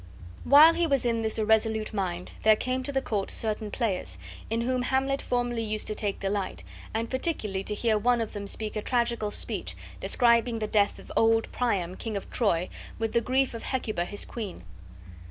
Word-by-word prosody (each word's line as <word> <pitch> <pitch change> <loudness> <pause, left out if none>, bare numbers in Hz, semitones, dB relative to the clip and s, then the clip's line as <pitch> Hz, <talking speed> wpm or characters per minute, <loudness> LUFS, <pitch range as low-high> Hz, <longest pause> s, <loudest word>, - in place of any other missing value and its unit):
While 305 +4 +8
he 345 0 +1
was 275 -5 +2
in 230 -1 +1
this 220 -1 -1
irresolute 220 0 +1
mind 180 -3 -3
there 220 0 +6
came 255 +4 -2
to 260 - -4
the 270 -1 0
court 200 -3 -2
certain 215 -1 -2
players, 205 -5 -2 0.3
in 225 +1 0
whom 255 +1 0
Hamlet 265 +2 0
formerly 245 -1 -1
used 215 -1 -2
to - - -1
take 205 -2 -2
delight, 195 -1 -2 0.3
and 225 +1 -2
particularly 245 - -1
to 210 - -1
hear 220 0 +1
one 245 +2 +3
of 225 -2 -3
them 200 -1 -5
speak 215 +1 -3
a 215 - -1
tragical 235 -2 0
speech, - - -1 0.2
describing 235 -1 +3
the 220 - -2
death 205 -1 +2
of - - -12
old 225 0 +3
Priam, 195 -8 0
King 220 0 -4
of 195 - -8
Troy, 185 -6 +1 0.3
with 225 -1 -2
the 235 - +3
grief 260 +2 +1
of 230 - -6
Hecuba 215 -9 -2
his 205 +3 -4
queen. 205 - -6
225 Hz, 190 wpm, -27 LUFS, 210-245 Hz, 0.3 s, While